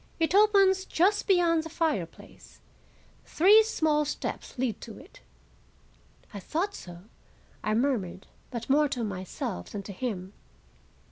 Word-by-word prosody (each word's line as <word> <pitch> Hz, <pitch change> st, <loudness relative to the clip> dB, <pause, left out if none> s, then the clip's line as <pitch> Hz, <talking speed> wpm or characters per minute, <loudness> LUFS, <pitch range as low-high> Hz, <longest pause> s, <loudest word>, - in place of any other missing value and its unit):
"It 325 Hz, +1 st, +1 dB
opens 395 Hz, -2 st, +4 dB
just 395 Hz, +5 st, +1 dB
beyond 345 Hz, -4 st, +3 dB
the 325 Hz, -, -8 dB
fireplace. 305 Hz, -, -4 dB, 0.7 s
Three 405 Hz, +7 st, +6 dB
small 315 Hz, -9 st, +1 dB
steps 295 Hz, -1 st, -5 dB
lead 245 Hz, -5 st, -2 dB
to 225 Hz, -, -9 dB
it." 420 Hz, -, -15 dB, 1.1 s
"I 200 Hz, -, -6 dB
thought 345 Hz, -, -2 dB
so," 175 Hz, -, -10 dB, 0.6 s
I 215 Hz, 0 st, 0 dB
murmured, 220 Hz, -8 st, -1 dB, 0.2 s
but 235 Hz, -2 st, -6 dB
more 295 Hz, +2 st, +3 dB
to 250 Hz, -4 st, -3 dB
myself 185 Hz, -, -5 dB
than 200 Hz, -, -6 dB
to 200 Hz, -, -8 dB
him. 195 Hz, -4 st, -5 dB
290 Hz, 130 wpm, -28 LUFS, -, 1.1 s, Three